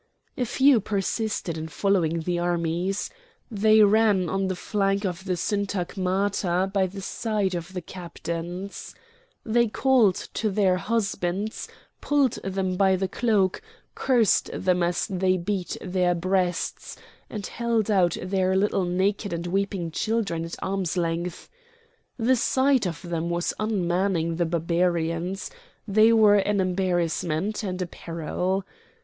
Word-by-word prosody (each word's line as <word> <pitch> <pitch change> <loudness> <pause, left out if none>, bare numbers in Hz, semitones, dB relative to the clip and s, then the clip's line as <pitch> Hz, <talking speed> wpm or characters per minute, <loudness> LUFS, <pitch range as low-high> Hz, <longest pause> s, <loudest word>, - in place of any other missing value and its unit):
A 250 - -1
few 265 +2 +4
persisted 200 -4 -2
in 160 - -5
following 170 -1 +1
the 175 +1 -1
armies. 175 +2 -1 0.4
They 215 0 +5
ran 205 -4 +3
on 195 +1 0
the 185 - -2
flank 195 +1 0
of 185 0 -4
the 185 -2 0
syntagmata 190 -1 -1
by 195 -2 +2
the 195 +2 -8
side 215 -4 -1
of 175 +2 -5
the 180 -2 -5
captains. 175 +1 -6 0.5
They 235 +1 +3
called 230 -4 +3 0.2
to 220 - 0
their 190 -2 +2
husbands, 205 -1 -2 0.3
pulled 285 -4 +2
them 190 -1 -2
by 190 -1 +4
the 190 +1 -1
cloak, 205 -4 +1 0.3
cursed 240 -5 +2
them 180 -1 0
as 175 0 +1
they 185 -1 +1
beat 185 0 -3
their 180 -1 0
breasts, 180 0 -1 0.3
and 210 -3 -5
held 230 -3 -1
out 180 -4 +3
their 185 0 +1
little 195 -1 +1
naked 195 +3 0
and 170 0 -3
weeping 190 -2 -1
children 205 -4 -1
at 165 - -6
arm's 190 -2 -2
length. 170 0 -2 0.7
The 250 +2 +3
sight 260 -2 +2
of 165 +1 -6
them 170 -1 -3
was 175 0 -1
unmanning 180 -5 0
the 175 -1 +1
Barbarians; 170 - -1 0.4
they 215 +2 +5
were 215 -2 +6
an 205 0 +1
embarrassment 180 0 0
and 185 -3 -4
a - - -3
peril. 175 +3 -3
190 Hz, 135 wpm, -25 LUFS, 175-205 Hz, 0.7 s, were